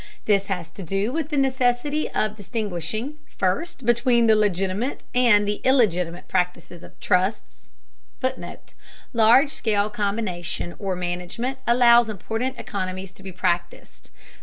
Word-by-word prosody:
This 200 Hz, -2 st, +2 dB
has 180 Hz, -4 st, -4 dB
to 195 Hz, -, -10 dB
do 195 Hz, +5 st, -1 dB
with 315 Hz, -1 st, -2 dB
the 300 Hz, -, -2 dB
necessity 265 Hz, +2 st, +1 dB
of 215 Hz, 0 st, -1 dB
distinguishing, 215 Hz, -, -4 dB, 0.2 s
first, 265 Hz, -, -1 dB
between 240 Hz, 0 st, +3 dB
the 220 Hz, -1 st, +5 dB
legitimate 200 Hz, +4 st, 0 dB
and 235 Hz, -5 st, +4 dB
the 205 Hz, 0 st, -1 dB
illegitimate 180 Hz, -10 st, +2 dB
practices 180 Hz, -1 st, -2 dB
of -, -, -15 dB
trusts 60 Hz, -, -1 dB, 0.5 s
[Footnote: 260 Hz, -, -5 dB, 0.4 s
Large 240 Hz, +5 st, +5 dB
scale 210 Hz, -4 st, 0 dB
combination 200 Hz, -5 st, -3 dB
or 195 Hz, -2 st, -2 dB
management 180 Hz, +9 st, -4 dB
allows 235 Hz, -1 st, +6 dB
important 225 Hz, +5 st, -3 dB
economies 190 Hz, -4 st, -5 dB
to 195 Hz, -, -18 dB
be 190 Hz, 0 st, -8 dB
practiced. 175 Hz, -1 st, -3 dB
210 Hz, 130 wpm, -23 LUFS, 185-240 Hz, 0.5 s, allows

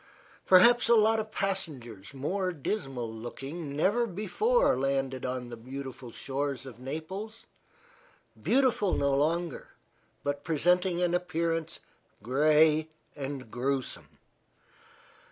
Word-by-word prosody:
Perhaps 235 Hz, +7 st, +6 dB
a 235 Hz, -, +7 dB
lot 220 Hz, 0 st, +4 dB
of 215 Hz, 0 st, -4 dB
passengers 145 Hz, -, -4 dB
more 180 Hz, +8 st, -1 dB
dismal 135 Hz, -, -3 dB
looking 140 Hz, +7 st, -6 dB
never 205 Hz, +10 st, +2 dB
before 425 Hz, -, +2 dB
landed 135 Hz, -1 st, -1 dB
on 125 Hz, -1 st, -4 dB
the 120 Hz, -, -6 dB
beautiful 130 Hz, +1 st, -8 dB
shores 135 Hz, +1 st, -3 dB
of 125 Hz, -3 st, -10 dB
Naples 185 Hz, -, -6 dB, 1.0 s
beautiful 255 Hz, -7 st, +2 dB
no 140 Hz, 0 st, +1 dB
longer, 160 Hz, +2 st, 0 dB, 0.6 s
but 145 Hz, 0 st, -2 dB
presenting 180 Hz, +2 st, +2 dB
an 175 Hz, -1 st, +1 dB
appearance 165 Hz, -2 st, -1 dB, 0.4 s
gray 155 Hz, +5 st, +4 dB, 0.3 s
and 135 Hz, -4 st, -6 dB
grewsome. 135 Hz, +1 st, -3 dB
155 Hz, 105 wpm, -29 LUFS, 135-185 Hz, 1.0 s, a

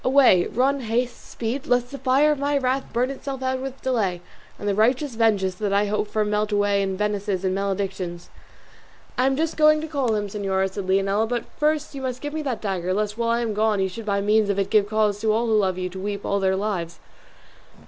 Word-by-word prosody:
Away, 255 Hz, -9 st, +5 dB
run, 270 Hz, +4 st, +1 dB
haste, 240 Hz, +1 st, -2 dB
speed! 245 Hz, +4 st, -4 dB
lest 245 Hz, 0 st, +1 dB
the 275 Hz, -, -7 dB
fire 270 Hz, +3 st, +3 dB
of 295 Hz, -, -1 dB
my 285 Hz, +1 st, +1 dB
wrath 265 Hz, 0 st, 0 dB
burn 250 Hz, +3 st, 0 dB
itself 270 Hz, -1 st, -6 dB
out 260 Hz, 0 st, 0 dB
with 270 Hz, 0 st, -7 dB
delay, 205 Hz, -9 st, 0 dB, 0.4 s
and 205 Hz, -, -5 dB
the 200 Hz, -, +2 dB
righteous 250 Hz, +6 st, +2 dB
vengeance 210 Hz, -5 st, +2 dB
that 200 Hz, +2 st, -3 dB
I 200 Hz, +1 st, +3 dB
hope 210 Hz, +1 st, -1 dB
for 215 Hz, 0 st, 0 dB
melt 210 Hz, 0 st, 0 dB
away 205 Hz, -1 st, +2 dB
in 190 Hz, -1 st, -2 dB
menaces 205 Hz, -2 st, -1 dB
and 185 Hz, -, +1 dB
maledictions." 190 Hz, -3 st, -3 dB, 0.8 s
"I 255 Hz, -, +2 dB
am 270 Hz, -, +2 dB
just 320 Hz, +1 st, -1 dB
going 305 Hz, 0 st, +5 dB
to 310 Hz, -, -4 dB
call 270 Hz, -7 st, 0 dB
him, 205 Hz, -1 st, -1 dB
señora," 195 Hz, -1 st, -1 dB
said 190 Hz, -1 st, -5 dB
Leonela; 195 Hz, +3 st, +2 dB
"but 240 Hz, -1 st, 0 dB
you -, -, -23 dB
must 305 Hz, 0 st, +1 dB
first 260 Hz, -3 st, -4 dB
give 290 Hz, 0 st, -5 dB
me 315 Hz, -, -2 dB
that 265 Hz, -6 st, -3 dB
dagger, 185 Hz, -2 st, -1 dB
lest 210 Hz, 0 st, -1 dB
while 230 Hz, 0 st, -1 dB
I 235 Hz, +1 st, +2 dB
am 225 Hz, -2 st, -1 dB
gone 215 Hz, 0 st, +1 dB
you 190 Hz, 0 st, +1 dB
should 215 Hz, +4 st, -8 dB
by 200 Hz, -1 st, +1 dB
means 210 Hz, +1 st, +2 dB
of 200 Hz, -, 0 dB
it 195 Hz, 0 st, -1 dB
give 205 Hz, -2 st, +3 dB
cause 210 Hz, -1 st, +1 dB
to 220 Hz, -, +2 dB
all 225 Hz, +2 st, +1 dB
who 225 Hz, -, +1 dB
love 190 Hz, -4 st, +2 dB
you 185 Hz, 0 st, -2 dB
to 190 Hz, +1 st, -8 dB
weep 200 Hz, +1 st, -4 dB
all 200 Hz, -, +1 dB
their 190 Hz, -1 st, +2 dB
lives." 190 Hz, -4 st, -3 dB
215 Hz, 235 wpm, -23 LUFS, 200-255 Hz, 0.8 s, Away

